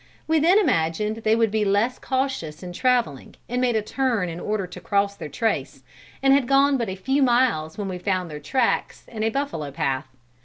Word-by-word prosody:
We 320 0 +3
then 345 +6 +5
imagined 210 - +1
they 220 0 +2
would 225 -2 +2
be 215 0 +1
less 205 +5 +1
cautious 260 - -2
in 180 -1 -7
traveling, 240 - 0
and 250 +1 -1
made 245 -2 +2
a 215 - +1
turn 230 -6 0
in 165 +1 -6
order 210 -1 -2
to 180 - -10
cross 200 0 0
their 155 - -7
trace, 145 - -2 0.4
and 270 0 +6
had 275 -3 +3
gone 275 +1 +4
but 235 -6 -1
a 190 - -4
few 265 +9 0
miles 240 - +2
when 205 -2 -3
we 185 -1 -5
found 185 -3 -1
their 150 - -6
tracks 240 - -1
in 220 -2 -7
a 220 - +2
buffalo 225 - -3
path. 135 -3 -2
215 Hz, 205 wpm, -23 LUFS, 175-255 Hz, 0.4 s, and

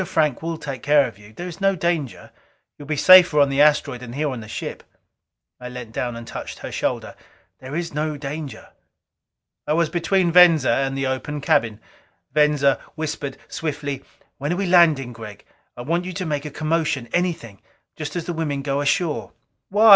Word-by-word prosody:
Frank 150 -6 +1
will 165 0 -3
take 135 -5 -6
care 145 -1 +4
of 110 -4 -12
you. 105 +1 -15
There 175 +11 -7
is 175 +2 -9
no 195 0 +3
danger; 160 - -2 0.4
you - - -11
will - - -15
be 155 - -1
safer 180 0 +7
on 140 -1 +5
the 135 +1 +2
asteroid 145 -4 +3
than 120 -1 -9
here 145 +1 -1
on 125 - -5
the 110 - -9
ship." - - -6 0.8
I 125 0 -7
leaned 125 -3 -8
down 120 0 -2
and 115 0 -8
touched - - -7
her - - -7
shoulder. - - -2 0.4
"There 130 +3 -7
is 170 -2 -3
no 150 0 -2
danger." 145 0 -7 1.0
I 150 - +2
was 165 0 +2
between 175 +1 +1
Venza 165 -6 +6
and 135 +2 0
the 135 - -1
open 130 +3 -3
cabin. 115 -6 +1 0.5
Venza 150 -2 +3 0.2
whispered 150 -3 -4
swiftly, 145 -3 -4 0.4
"When 150 +6 -1
we 200 - -1
are - - -2
landing, 155 -8 +4
Gregg, 110 -3 -10 0.3
I 120 - -6
want 170 +6 -1
you 185 - -5
to 185 +1 -4
make 150 -2 -2
a - - -4
commotion 155 -4 -1
anything 165 - -2 0.3
just 150 0 -6
as 175 - -3
the 175 - -3
women 150 -4 -2
go 140 0 -1
ashore." 145 - 0 0.4
"Why? 215 +3 +5
150 Hz, 190 wpm, -22 LUFS, 135-165 Hz, 1.0 s, safer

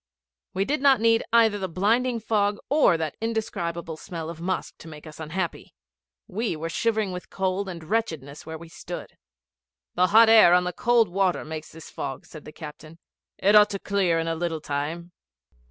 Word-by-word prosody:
We 195 +1 +1
did 290 +3 -1
not 275 -3 +5
need 230 0 +3
either 225 -3 +4
the 190 - -2
blinding 230 +7 +1
fog 205 -2 0
or 280 - +4
that 160 -2 -3
indescribable 170 -8 -3
smell 165 -2 -6
of 165 0 -11
musk 185 +2 -3
to - - -12
make 150 -1 -11
us 155 0 -11
unhappy 170 +3 -4 0.5
we 215 -2 -2
were 165 +2 -5
shivering 220 +1 0
with 180 0 -7
cold 190 +1 -2
and 170 -3 -7
wretchedness 155 -8 -3
where 160 0 -7
we 170 +1 -12
stood. 165 - -8 0.8
'The 180 +1 +3
hot 220 +4 +7
air 220 -6 +7
on 180 - +3
the 180 0 -3
cold 240 -2 +3
water 185 0 0
makes 155 0 -7
this 160 0 -12
fog,' 135 -2 -6
said 155 - -12
the - - -9
captain; 155 +1 -11 0.4
'it 205 +2 +3
ought 210 0 +7
to 200 - -3
clear 190 -5 +1
in 165 0 -1
a 165 - 0
little 165 -1 -2
time.' 155 +5 -4
180 Hz, 185 wpm, -25 LUFS, 160-215 Hz, 0.8 s, hot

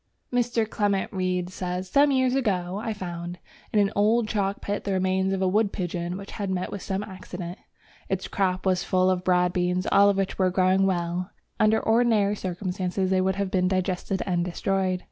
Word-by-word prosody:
Mr. 240 -2 +1
Clement 205 -2 0
Reid 185 -1 -1
says: 180 0 -4
"Some 285 +9 +4
years 260 -2 +2
ago 195 -7 0
I 230 - -2
found... 175 -3 -5 0.3
in - - 0
an 200 -1 +3
old 215 +3 +3
chalk 200 -2 -1
pit 205 0 -3
the 200 - -1
remains 190 0 +1
of 190 0 0
a - - +3
wood 205 +2 +2
pigeon 175 0 -3
which 200 0 -9
had 200 -2 -4
met 185 -1 -2
with 200 - -5
some 195 +1 -2
accident. 185 -3 -8 0.5
Its 190 -1 -2
crop 185 -1 -1
was 185 -1 +2
full 185 0 +2
of 180 -1 -1
broad 180 -1 +2
beans, 180 0 0
all 200 +1 +6
of 200 - +1
which 195 0 -2
were 185 -1 +4
growing 185 +1 +3
well, 175 0 -1 0.3
though - - +5
under 220 +1 +4
ordinary 220 -3 +3
circumstances 185 0 -2
they 185 0 +3
would 190 0 +1
have 200 -1 -2
been 185 -1 +2
digested 185 0 -1
and 175 -2 0
destroyed." 185 +1 -1
190 Hz, 200 wpm, -26 LUFS, 180-200 Hz, 0.5 s, all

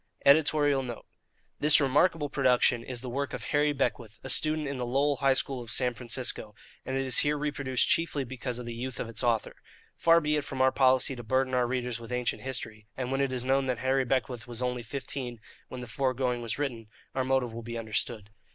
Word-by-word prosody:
[EDITORIAL 145 -1 +4
NOTE. 120 -3 -7 0.5
This 150 +1 +6
remarkable 145 +3 +2
production 125 -3 +2
is 125 -2 -5
the 130 - -7
work 135 +1 -3
of - - -5
Harry 145 0 +2
Beckwith, 120 -5 -2
a 135 - -3
student 155 +2 +3
in 140 -1 -3
the - - -1
Lowell 140 +3 +2
High 135 -2 +3
School 130 -1 -1
of 120 - -10
San 125 +1 +1
Francisco, 120 -3 -4 0.3
and 130 - -2
it 135 - 0
is 130 - +3
here 150 0 +1
reproduced 140 -3 +1
chiefly 160 -4 +1
because 125 -1 -5
of 125 - -6
the 120 - -5
youth 125 +2 -5
of - - -3
its 115 +2 -3
author. 115 -3 0 0.4
Far 165 0 +5
be 150 -1 +1
it 150 - -1
from 135 -2 -6
our 130 0 +5
policy 130 0 +3
to 120 - -7
burden 130 +2 0
our 125 -1 +2
readers 125 -2 -2
with 115 +1 -10
ancient 125 -1 -1
history; 110 -5 -5
and 130 -1 -3
when 135 +1 +1
it 135 -1 0
is 125 -1 -2
known 135 +1 +2
that 125 -2 0
Harry 130 +2 +1
Beckwith 125 -2 -2
was 120 0 -4
only 125 -1 -1
fifteen 125 0 -5 0.3
when 125 - -7
the 125 - -7
fore 130 +2 -1
going 125 -2 -1
was 115 -2 -3
written, 125 -6 -3 0.3
our 130 - 0
motive 130 -3 0
will 115 - -6
be 115 0 -6
understood. 110 -1 -2
130 Hz, 225 wpm, -29 LUFS, 120-140 Hz, 0.5 s, This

